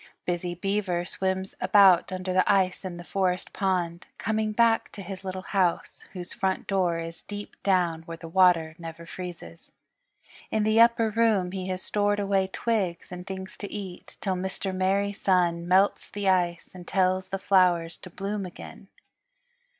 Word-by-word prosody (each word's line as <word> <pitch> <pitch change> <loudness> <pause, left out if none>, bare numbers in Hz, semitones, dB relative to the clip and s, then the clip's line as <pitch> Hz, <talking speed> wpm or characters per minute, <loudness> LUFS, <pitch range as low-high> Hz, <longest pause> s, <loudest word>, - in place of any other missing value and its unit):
Busy 175 0 -2
Beaver 190 -2 -1
swims 190 +1 -2
about 190 -2 +5
under 185 0 -3
the 185 +2 +3
ice 190 -2 +1
in 180 -2 -5
the 175 - -8
Forest 185 0 -1
Pond, 180 -3 -1
coming 220 -1 -1
back 230 +1 +2
to 200 - -8
his 190 +1 -7
little 185 0 -5
house, 185 -4 -1
whose 180 -2 -6
front 190 -4 -1
door 185 -4 +1
is 165 0 -6
deep 205 0 -8
down 175 -4 +1
where 165 0 -6
the 165 - -9
water 170 -2 +4
never 165 0 -8
freezes. 165 - -9 0.8
In 220 - +1
the 215 +1 +4
upper 230 -1 +4
room 215 -5 +2
he 190 -1 -4
has 185 0 -3
stored 205 0 +1
away 195 -1 +1
twigs 190 -5 -2
and 180 +1 -8
things 190 -1 -6
to 200 - -7
eat 190 -4 -8
till 195 - 0
Mr. 190 +1 -3
Merry 195 +2 +1
Sun 175 -4 +1
melts 190 +3 +3
the 205 -1 -3
ice 175 -2 +1
and 180 -1 -11
tells 185 0 +1
the 195 - -3
flowers 180 -3 +3
to 185 - -11
bloom 200 +3 -4
again. 180 -2 -10
185 Hz, 165 wpm, -27 LUFS, 175-200 Hz, 0.8 s, about